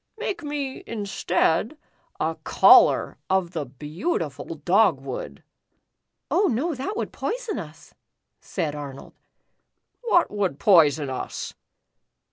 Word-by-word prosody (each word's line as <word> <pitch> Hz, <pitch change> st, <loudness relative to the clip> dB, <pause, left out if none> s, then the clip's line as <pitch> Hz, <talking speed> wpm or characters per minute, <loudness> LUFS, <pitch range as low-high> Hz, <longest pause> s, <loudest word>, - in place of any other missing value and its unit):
Make 400 Hz, -5 st, -3 dB
me, 290 Hz, -3 st, -4 dB
instead, 205 Hz, -, 0 dB, 0.4 s
a -, -, 0 dB
collar -, -, +5 dB
of 190 Hz, -2 st, +1 dB
the 155 Hz, -6 st, -4 dB
beautiful 150 Hz, -, -4 dB
dog 175 Hz, 0 st, +3 dB
wood." 125 Hz, -, -7 dB, 0.9 s
"Oh 380 Hz, +6 st, +3 dB
no, 295 Hz, +6 st, 0 dB
that 305 Hz, +11 st, -4 dB
would -, -, -3 dB
poison 465 Hz, -, -3 dB
us," 160 Hz, -4 st, -11 dB, 0.5 s
said 150 Hz, -2 st, -3 dB
Arnold. 140 Hz, -2 st, -8 dB, 0.9 s
"What 430 Hz, -8 st, +2 dB
would 200 Hz, -8 st, -1 dB
poison 150 Hz, -6 st, +4 dB
us 130 Hz, -, -5 dB
190 Hz, 105 wpm, -24 LUFS, -, 0.9 s, collar